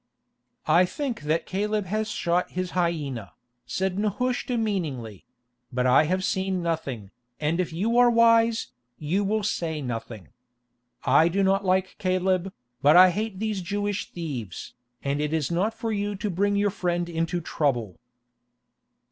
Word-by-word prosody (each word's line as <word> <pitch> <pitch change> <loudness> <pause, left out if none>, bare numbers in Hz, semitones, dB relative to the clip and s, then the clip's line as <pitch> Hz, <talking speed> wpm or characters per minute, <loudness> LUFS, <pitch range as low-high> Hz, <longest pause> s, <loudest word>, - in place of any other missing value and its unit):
"I 180 +2 +5
think 245 - -4
that 160 +2 +1
Caleb 210 +2 -1
has 215 +3 -2
shot 175 -3 0
his 185 0 -3
hyena," 150 - -2 0.3
said 190 +8 -1
Nehushta 245 +4 -1
meaningly; 150 - -3 0.5
"but 125 0 0
I 130 +4 +5
have 185 +4 0
seen 190 -1 -1
nothing, 135 - -3 0.3
and 155 +3 0
if 180 - -1
you 220 +9 +1
are 245 0 +7
wise, 230 -1 +4 0.3
you 170 +7 0
will 215 +2 0
say 165 -6 -2
nothing. 115 -6 -6 0.7
I 160 - +5
do 195 +3 +1
not 195 +1 +2
like 185 0 +1
Caleb, 185 0 0 0.3
but 145 +3 +6
I 185 0 +9
hate 210 +1 -3
these 215 -1 -2
Jewish 205 +3 -2
thieves, 135 - -6 0.3
and 140 +1 -1
it 150 +1 -1
is 160 -1 0
not 185 +6 +1
for 225 0 -3
you 205 -1 -1
to 210 +1 -3
bring 200 +3 +1
your 205 0 +2
friend 175 -2 -1
into 165 +1 -1
trouble." 130 - -1
185 Hz, 150 wpm, -26 LUFS, 160-205 Hz, 0.7 s, I